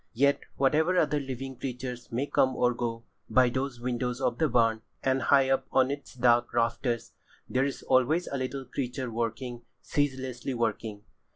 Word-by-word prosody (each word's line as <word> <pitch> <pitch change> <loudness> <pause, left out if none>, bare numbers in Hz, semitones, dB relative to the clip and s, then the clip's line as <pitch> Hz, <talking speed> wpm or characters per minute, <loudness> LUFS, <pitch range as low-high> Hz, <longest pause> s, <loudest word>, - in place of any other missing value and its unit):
Yet, 140 +4 +4 0.2
whatever 155 +7 +3
other 150 -3 +3
living 135 -1 -5
creatures 125 -1 -5
may 125 +4 0
come 130 -2 +2
or 125 0 +2
go, 115 -1 -3 0.3
by 130 -1 +5
those 130 -1 -2
windows 125 0 -2
of 125 -3 0
the 160 - +3
barn, 115 -3 +3 0.2
and 135 0 +2
high 135 +1 +4
up 135 0 +1
on 130 0 +3
its 140 -2 -6
dark 120 -1 +3
rafters, 115 0 0 0.4
there 130 +1 +1
is 140 - -4
always 135 +7 +3
a 140 - -3
living 130 +1 -3
creature 130 -1 -3
working, 120 +2 -3 0.2
ceaselessly 130 -3 -1
working. 110 -2 -2
130 Hz, 165 wpm, -29 LUFS, 120-135 Hz, 0.4 s, by